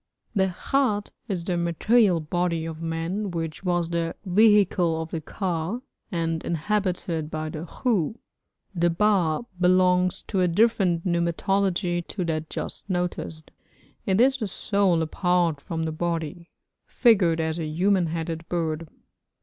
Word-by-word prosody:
The 190 Hz, -3 st, +2 dB, 0.2 s
khat 235 Hz, -7 st, +2 dB, 0.2 s
is 185 Hz, -6 st, -2 dB
the 180 Hz, -2 st, 0 dB
material 175 Hz, +3 st, +3 dB
body 170 Hz, +1 st, -1 dB
of 165 Hz, 0 st, -6 dB
man 165 Hz, +5 st, -2 dB
which 165 Hz, -1 st, -4 dB
was 175 Hz, -2 st, 0 dB
the 170 Hz, -1 st, -1 dB
vehicle 190 Hz, -4 st, +4 dB
of 160 Hz, 0 st, -5 dB
the 165 Hz, -, -3 dB
ka, 180 Hz, +5 st, -3 dB, 0.3 s
and 165 Hz, -2 st, -1 dB
inhabited 175 Hz, -2 st, -1 dB
by 155 Hz, 0 st, -3 dB
the 155 Hz, +2 st, -6 dB
khu. 215 Hz, -, 0 dB, 0.6 s
The 175 Hz, -1 st, +2 dB
ba 175 Hz, -3 st, +2 dB, 0.2 s
belongs 180 Hz, 0 st, +3 dB
to 195 Hz, -3 st, -1 dB
a 180 Hz, -, +4 dB
different 185 Hz, -2 st, +2 dB
pneumatology 175 Hz, +1 st, 0 dB
to 185 Hz, -4 st, -3 dB
that 155 Hz, -1 st, -2 dB
just -, -, -6 dB
noticed. 175 Hz, -3 st, -3 dB, 0.6 s
It 190 Hz, +1 st, +2 dB
is 265 Hz, +2 st, +4 dB
the 220 Hz, -5 st, -3 dB
soul 195 Hz, -3 st, +1 dB
apart 170 Hz, -2 st, +1 dB
from 160 Hz, 0 st, -3 dB
the 160 Hz, -, -1 dB
body, 170 Hz, +1 st, -3 dB, 0.4 s
figured 190 Hz, -9 st, +3 dB
as 160 Hz, +1 st, -1 dB
a 160 Hz, -, -2 dB
human 180 Hz, +3 st, +2 dB
headed 165 Hz, 0 st, -4 dB
bird. 165 Hz, -2 st, -2 dB
175 Hz, 140 wpm, -25 LUFS, 165-195 Hz, 0.6 s, vehicle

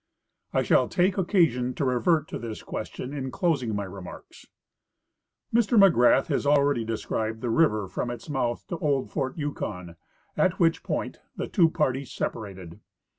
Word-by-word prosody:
I -, -, +1 dB
shall -, -, +3 dB
take 185 Hz, +1 st, +2 dB
occasion 160 Hz, -, +2 dB
to 140 Hz, -, -1 dB
revert 150 Hz, +5 st, +2 dB
to -, -, -5 dB
this 115 Hz, -2 st, -6 dB
question 125 Hz, +4 st, -6 dB
in 135 Hz, -2 st, -4 dB
closing 135 Hz, -, 0 dB
my 100 Hz, -, -2 dB
re 95 Hz, 0 st, -8 dB
marks. 90 Hz, -, -12 dB, 1.1 s
Mr 230 Hz, 0 st, +3 dB
McGrath 165 Hz, -, +6 dB
has -, -, -1 dB
already 140 Hz, -3 st, +3 dB
described 110 Hz, 0 st, -3 dB
the 120 Hz, -, -1 dB
river 110 Hz, -8 st, +2 dB
from 120 Hz, -, -3 dB
its 120 Hz, -1 st, -7 dB
mouth 130 Hz, -5 st, -2 dB
to 170 Hz, -, -4 dB
old 140 Hz, -4 st, 0 dB
fort 135 Hz, -1 st, -2 dB
Yukon, 90 Hz, -, -5 dB, 0.4 s
at 185 Hz, -1 st, +1 dB
which 165 Hz, -2 st, +3 dB
point -, -, -3 dB, 0.2 s
the -, -, -4 dB
two 170 Hz, -6 st, +4 dB
parties 135 Hz, -4 st, -1 dB
separated. 95 Hz, -6 st, -5 dB
130 Hz, 160 wpm, -26 LUFS, 115-165 Hz, 1.1 s, McGrath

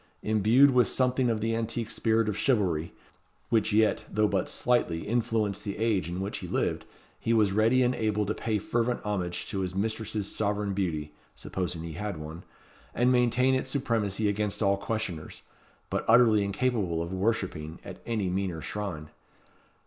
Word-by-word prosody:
Imbued 110 Hz, +6 st, +5 dB
with 125 Hz, -1 st, +4 dB
something 130 Hz, -1 st, +2 dB
of 110 Hz, -2 st, 0 dB
the 115 Hz, +1 st, 0 dB
antique 115 Hz, 0 st, -2 dB
spirit 115 Hz, -1 st, +1 dB
of 105 Hz, -, -1 dB
chivalry, 95 Hz, -, +1 dB, 0.6 s
which 110 Hz, -3 st, +2 dB
yet, 110 Hz, +1 st, +3 dB
though 105 Hz, 0 st, +2 dB
but 95 Hz, -3 st, -1 dB
slightly, 105 Hz, -9 st, +1 dB
influenced 110 Hz, -3 st, 0 dB
the 100 Hz, -2 st, -4 dB
age 105 Hz, -6 st, 0 dB
in 90 Hz, +2 st, -4 dB
which 100 Hz, -, -3 dB
he -, -, -7 dB
lived, -, -, -1 dB, 0.3 s
he 115 Hz, -, 0 dB
was 105 Hz, -3 st, +3 dB
ready 115 Hz, +5 st, +3 dB
and 125 Hz, +1 st, +2 dB
able 105 Hz, -3 st, 0 dB
to 105 Hz, -, -1 dB
pay 110 Hz, -1 st, -1 dB
fervent 120 Hz, +4 st, -1 dB
homage 90 Hz, -4 st, -2 dB
to 100 Hz, -, -4 dB
his 90 Hz, -1 st, -3 dB
mistress's 110 Hz, 0 st, -2 dB
sovereign 105 Hz, -1 st, -1 dB
beauty 80 Hz, -6 st, -2 dB, 0.2 s
(supposing 90 Hz, -3 st, -4 dB
he 85 Hz, -1 st, -6 dB
had 100 Hz, +1 st, -4 dB
one), 80 Hz, +3 st, -8 dB, 0.5 s
and 125 Hz, +1 st, +3 dB
maintain 125 Hz, +1 st, +3 dB
its 130 Hz, -, -1 dB
supremacy 110 Hz, -6 st, 0 dB
against 105 Hz, +1 st, -1 dB
all 100 Hz, 0 st, +3 dB
questioners, 100 Hz, -6 st, -4 dB, 0.5 s
but -, -, 0 dB
utterly 115 Hz, -3 st, +6 dB
incapable 100 Hz, -4 st, 0 dB
of 85 Hz, +2 st, -6 dB
worshipping 95 Hz, -6 st, -2 dB
at -, -, -9 dB
any 110 Hz, -5 st, -1 dB
meaner 90 Hz, -2 st, -2 dB
shrine. 80 Hz, -5 st, -5 dB
105 Hz, 165 wpm, -28 LUFS, 95-115 Hz, 0.6 s, utterly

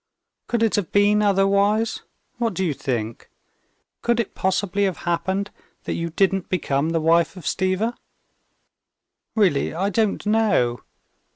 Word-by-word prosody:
Could 235 Hz, -1 st, 0 dB
it 225 Hz, -, +2 dB
have 200 Hz, -5 st, -2 dB
been 205 Hz, +1 st, +4 dB
otherwise? 200 Hz, +2 st, +2 dB, 0.4 s
What 230 Hz, -5 st, 0 dB
do 190 Hz, -, 0 dB
you 160 Hz, -, 0 dB
think? 115 Hz, -4 st, -4 dB, 0.7 s
Could 235 Hz, 0 st, +1 dB
it 230 Hz, -, -2 dB
possibly 195 Hz, +1 st, 0 dB
have 190 Hz, -3 st, -1 dB
happened 190 Hz, +4 st, -1 dB, 0.3 s
that -, -, -3 dB
you 170 Hz, 0 st, -3 dB
didn't 190 Hz, +2 st, +1 dB
become 150 Hz, -4 st, 0 dB
the 165 Hz, 0 st, 0 dB
wife 165 Hz, +3 st, +2 dB
of 180 Hz, -, -9 dB
Stiva?" 190 Hz, +5 st, 0 dB, 1.4 s
"Really, 180 Hz, -9 st, +2 dB
I 195 Hz, +4 st, 0 dB
don't 215 Hz, 0 st, 0 dB
know. 205 Hz, -, +2 dB
195 Hz, 135 wpm, -22 LUFS, 170-210 Hz, 1.4 s, been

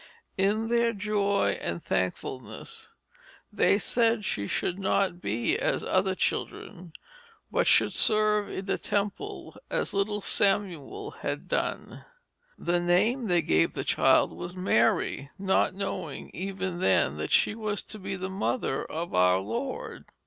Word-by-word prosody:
In 205 Hz, +3 st, +1 dB
their 235 Hz, 0 st, +2 dB
joy 200 Hz, -1 st, 0 dB
and 85 Hz, 0 st, -3 dB
thankfulness 105 Hz, +7 st, -4 dB, 0.6 s
they -, -, +4 dB
said 230 Hz, 0 st, +1 dB
she 100 Hz, -, -2 dB
should 180 Hz, +2 st, -2 dB
not 190 Hz, -2 st, 0 dB
be 110 Hz, +4 st, 0 dB
as -, -, 0 dB
other -, -, +1 dB
children, 170 Hz, -2 st, -3 dB, 0.6 s
but -, -, +1 dB
should -, -, +4 dB
serve 215 Hz, -1 st, +3 dB
in 190 Hz, -, -5 dB
the 195 Hz, -, -1 dB
temple 210 Hz, -, -3 dB
as -, -, -1 dB
little 205 Hz, +1 st, 0 dB
Samuel 200 Hz, -, 0 dB
had -, -, -5 dB
done. -, -, -3 dB, 0.5 s
The 175 Hz, 0 st, 0 dB
name 210 Hz, +8 st, +2 dB
they 175 Hz, -3 st, +2 dB
gave 80 Hz, -, +2 dB
the -, -, -2 dB
child -, -, +3 dB
was 175 Hz, +1 st, -7 dB
Mary, 140 Hz, -4 st, +1 dB
not 190 Hz, -1 st, +1 dB
knowing 185 Hz, -6 st, -5 dB
even 190 Hz, -1 st, -4 dB
then 75 Hz, -, +2 dB
that 75 Hz, -, -4 dB
she -, -, +4 dB
was 215 Hz, -2 st, -3 dB
to 215 Hz, -, -8 dB
be 195 Hz, 0 st, -4 dB
the 190 Hz, 0 st, -4 dB
mother 190 Hz, -, -1 dB
of 170 Hz, +2 st, -5 dB
our 90 Hz, 0 st, +4 dB
Lord. 240 Hz, -, -4 dB
195 Hz, 140 wpm, -28 LUFS, 170-210 Hz, 0.6 s, they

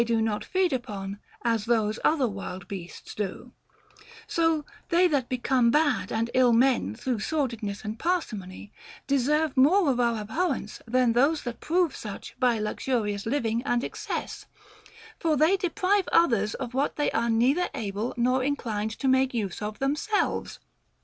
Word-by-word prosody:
do 230 Hz, -1 st, +1 dB
not 220 Hz, -1 st, -1 dB
feed 370 Hz, -4 st, +1 dB
upon 205 Hz, -6 st, -4 dB, 0.2 s
as 230 Hz, -3 st, +1 dB
those 220 Hz, -2 st, +1 dB
other 290 Hz, -5 st, +3 dB
wild 195 Hz, -3 st, -6 dB
beasts 180 Hz, -3 st, -8 dB
do; 210 Hz, +4 st, -5 dB, 0.7 s
so 325 Hz, -6 st, +1 dB, 0.2 s
they 355 Hz, +1 st, +5 dB
that 280 Hz, -7 st, 0 dB
become 250 Hz, -1 st, +2 dB
bad 290 Hz, -1 st, +2 dB
and 225 Hz, +1 st, -1 dB
ill 255 Hz, -1 st, +5 dB
men 235 Hz, -, +3 dB
through 250 Hz, -, -2 dB
sordidness 230 Hz, -7 st, -2 dB
and 215 Hz, +2 st, -5 dB
parsi 350 Hz, -9 st, 0 dB
mony 190 Hz, +1 st, -9 dB, 0.3 s
deserve 285 Hz, +2 st, +1 dB
more 300 Hz, +5 st, +5 dB
of 250 Hz, -, -1 dB
our 235 Hz, -2 st, +2 dB
abhorrence 265 Hz, -, -2 dB
than 245 Hz, 0 st, +3 dB
those 285 Hz, +6 st, +2 dB
that 240 Hz, -2 st, -5 dB
prove 345 Hz, -2 st, +1 dB
such 205 Hz, -3 st, -8 dB
by 245 Hz, -3 st, +3 dB
luxurious 210 Hz, -1 st, -2 dB
living 230 Hz, -3 st, 0 dB
and 245 Hz, -2 st, 0 dB
excess, -, -, -5 dB, 0.7 s
for 315 Hz, -2 st, +1 dB
they 315 Hz, +7 st, +4 dB
de 365 Hz, -2 st, -1 dB
prive 400 Hz, +1 st, +1 dB
others 230 Hz, -11 st, +3 dB
of 250 Hz, -2 st, -5 dB
what 275 Hz, +3 st, 0 dB
they 295 Hz, -, 0 dB
are 235 Hz, +1 st, 0 dB
neither 255 Hz, +10 st, +2 dB
able 215 Hz, -1 st, -3 dB
nor 255 Hz, +2 st, +2 dB
inclined 225 Hz, -6 st, -2 dB
to 245 Hz, +5 st, -3 dB
make 260 Hz, -1 st, +3 dB
use 205 Hz, -5 st, -3 dB
of 210 Hz, 0 st, -4 dB
themselves. 300 Hz, -, -1 dB
245 Hz, 160 wpm, -27 LUFS, 220-290 Hz, 0.7 s, they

